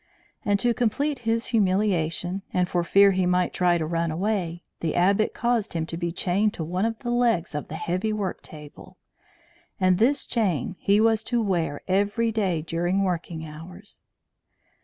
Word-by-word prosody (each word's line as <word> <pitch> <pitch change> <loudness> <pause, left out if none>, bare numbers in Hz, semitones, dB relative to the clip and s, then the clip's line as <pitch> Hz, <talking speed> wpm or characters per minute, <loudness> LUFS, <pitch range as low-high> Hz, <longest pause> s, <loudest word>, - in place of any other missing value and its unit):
And 205 -1 +1
to 240 -1 +2
complete 255 +5 0
his 230 0 +1
humiliation, 185 -3 +1
and 180 -1 +1
for 175 -1 0
fear 200 +3 +5
he 185 -1 +1
might 180 0 +1
try 175 -1 +2
to 160 - -2
run 165 +1 -1
away, 175 -1 -2 0.2
the 165 - -2
Abbot 195 +4 +2
caused 235 -3 0
him 165 -1 -1
to 165 - -6
be 170 0 -2
chained 195 +4 0
to 165 - -4
one 180 +6 -1
of 225 0 -2
the 240 -2 -3
legs 235 -9 +1
of 150 - -4
the 155 - -7
heavy 185 +6 -2
work 205 -3 -3
table; 150 -2 -12 0.8
and 185 -1 +3
this 265 +6 +2
chain 190 - -1
he 200 +1 +3
was 220 0 +3
to 240 - 0
wear 175 -9 -1
every 205 +4 +1
day 190 -8 0
during 175 +4 0
working 170 -3 -3
hours. 175 +6 -11
185 Hz, 175 wpm, -25 LUFS, 170-215 Hz, 0.8 s, fear